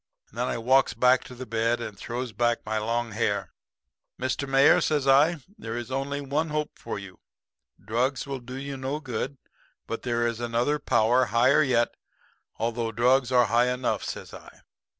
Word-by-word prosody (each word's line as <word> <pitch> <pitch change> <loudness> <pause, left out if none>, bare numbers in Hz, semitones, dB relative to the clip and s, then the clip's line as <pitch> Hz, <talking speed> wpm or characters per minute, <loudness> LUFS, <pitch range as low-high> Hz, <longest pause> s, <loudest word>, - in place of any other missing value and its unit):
And 115 - -11
then 125 - 0
I - - -2
walks 130 +3 +3
back 125 0 +4
to 125 - -10
the 130 +1 -7
bed 115 +1 0
and 110 -3 -6
throws 120 +4 -5
back 120 +2 0
my 110 0 -1
long 115 +2 -1
hair. 105 -1 -1 0.7
"'Mr. 130 +2 -2
Mayor,' 135 +1 +5
says 145 -3 0
I, 145 +3 +4 0.2
'there 115 +1 -5
is 120 +1 -6
only 140 +2 -2
one 145 +4 -1
hope 150 0 -2
for - - -6
you. 95 -2 -10 0.7
Drugs 125 +5 0
will 135 -1 -4
do 125 +1 -9
you 135 +1 -5
no 135 +3 -3
good. 135 0 -4 0.5
But 115 - -5
there 120 -1 0
is 115 -1 -2
another 120 +5 0
power 125 -1 +3
higher 120 +6 +4
yet, 125 -5 +2 0.6
although 115 0 -1
drugs 125 +3 +2
are 125 -1 +5
high 120 +3 +2
enough,' 125 0 -1
says - - -6
I. - - -13
125 Hz, 180 wpm, -26 LUFS, 115-135 Hz, 0.7 s, Mayor